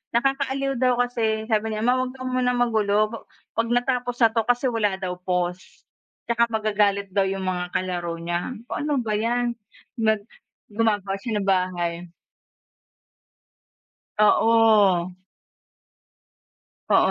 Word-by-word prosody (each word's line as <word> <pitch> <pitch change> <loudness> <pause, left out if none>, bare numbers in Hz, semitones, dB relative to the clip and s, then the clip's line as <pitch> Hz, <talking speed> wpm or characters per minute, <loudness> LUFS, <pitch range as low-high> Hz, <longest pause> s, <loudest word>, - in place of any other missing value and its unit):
nakakaaliw 270 +1 0
daw 255 -1 +3
kasi 220 -3 -1
sabi 220 0 +1
niya, 215 - -3
"Ma 250 +2 +3
'wag 255 0 -3
ka 255 - -8
munang 255 -1 0
magulo 215 -2 +2
pa 230 - -5 0.4
'pag 230 - +1
natapos 245 0 0
na 225 - +7
'to 225 0 +1
kasi 245 +2 +2
wala 210 -4 0
daw 180 -1 -2
pause, 180 0 -1 0.7
tsaka 235 0 +3
magagalit 205 -3 0
daw 195 0 +2
yung 190 0 -3
mga 180 -1 -2
kalaro 175 -2 -2
niya." 175 +8 -3
Sabi 225 - -12
ko, - - -19
"Anu 295 0 -1
ba 215 - -3
yan." 240 +1 0 0.5
Nag 220 -2 +2 0.5
gumagawa 205 -3 0
siya 215 -1 -2
ng - - -6
bahay. 175 -2 0 2.1
Oo. 210 -4 +4 1.8
Oo, - - +5
220 Hz, 135 wpm, -24 LUFS, 190-245 Hz, 2.1 s, na